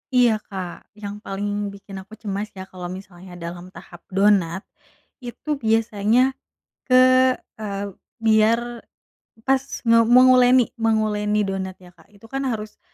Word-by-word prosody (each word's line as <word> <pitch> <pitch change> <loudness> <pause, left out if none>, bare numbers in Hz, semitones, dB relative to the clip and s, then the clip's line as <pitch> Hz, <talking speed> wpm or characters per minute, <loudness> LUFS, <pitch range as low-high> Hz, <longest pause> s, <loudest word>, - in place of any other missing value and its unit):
Iya 235 -4 +4
Kak, 185 -3 -7
yang 205 -1 -7
paling 205 0 -3
bikin 200 -1 -9
aku 195 +3 -12
cemas 205 -1 -4
ya 190 - -7
kalau 185 -2 -8
misalnya 185 -1 -10
dalam 175 +1 -7
tahap - - -12
donat, 195 -2 +2 0.6
itu 245 +4 -9
biasanya 225 +3 +2 0.6
ke 255 - +4 0.6
eee, 200 -2 -4 0.3
biar 220 +1 +4 0.9
pas 265 0 +3 0.3
nge 230 0 +6
menguleni 250 0 +6
menguleni 210 -2 +1
donat 190 -1 -3
ya 180 - -14
Kak, - - -23
itu 200 +3 -16
kan 270 0 -2
harus, 215 -3 -4
210 Hz, 130 wpm, -22 LUFS, 195-225 Hz, 0.9 s, nge